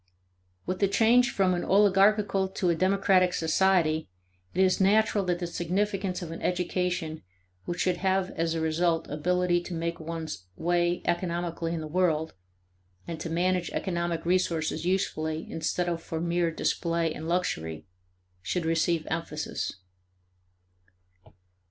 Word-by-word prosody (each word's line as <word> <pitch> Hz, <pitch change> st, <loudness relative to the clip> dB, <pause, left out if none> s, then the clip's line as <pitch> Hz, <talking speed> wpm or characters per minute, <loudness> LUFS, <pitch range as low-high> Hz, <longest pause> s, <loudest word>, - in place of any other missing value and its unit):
With 185 Hz, +1 st, -3 dB
the 200 Hz, -, +3 dB
change 235 Hz, +5 st, +4 dB
from 190 Hz, -5 st, +2 dB
an 175 Hz, -, -1 dB
oligarchical 200 Hz, 0 st, +4 dB
to 185 Hz, -2 st, 0 dB
a -, -, +1 dB
democratic 185 Hz, 0 st, +3 dB
society, 160 Hz, -2 st, +2 dB, 0.4 s
it 180 Hz, -, -4 dB
is 185 Hz, +1 st, +2 dB
natural 205 Hz, +1 st, +3 dB
that 175 Hz, -1 st, 0 dB
the 175 Hz, -, -3 dB
significance 185 Hz, +2 st, -1 dB
of 165 Hz, -, -6 dB
an 165 Hz, -, -7 dB
education 180 Hz, -2 st, -1 dB, 0.4 s
which 175 Hz, -, -3 dB
should 180 Hz, -1 st, +1 dB
have 190 Hz, 0 st, 0 dB
as 165 Hz, 0 st, -1 dB
a 165 Hz, -, -1 dB
result 165 Hz, +1 st, +1 dB
ability 175 Hz, +3 st, +1 dB
to 175 Hz, 0 st, -6 dB
make 170 Hz, +1 st, -3 dB
one's 160 Hz, -, -6 dB
way 175 Hz, -, 0 dB
economically 170 Hz, -1 st, -1 dB
in 165 Hz, -1 st, -2 dB
the 155 Hz, -, -5 dB
world, 160 Hz, -2 st, +1 dB, 0.7 s
and 165 Hz, -2 st, -5 dB
to 165 Hz, -, -4 dB
manage 180 Hz, +1 st, 0 dB
economic 170 Hz, -3 st, -2 dB
resources 170 Hz, -2 st, 0 dB
usefully 160 Hz, -4 st, -1 dB
instead 170 Hz, +2 st, -1 dB
of 170 Hz, -1 st, -2 dB
for 160 Hz, -1 st, -4 dB
mere 170 Hz, 0 st, +1 dB
display 165 Hz, 0 st, -1 dB
and 160 Hz, +1 st, -7 dB
luxury, 80 Hz, -, -2 dB, 0.6 s
should 165 Hz, -, -2 dB
receive 165 Hz, 0 st, +1 dB
emphasis. 160 Hz, -2 st, -3 dB
175 Hz, 140 wpm, -28 LUFS, 165-185 Hz, 0.7 s, change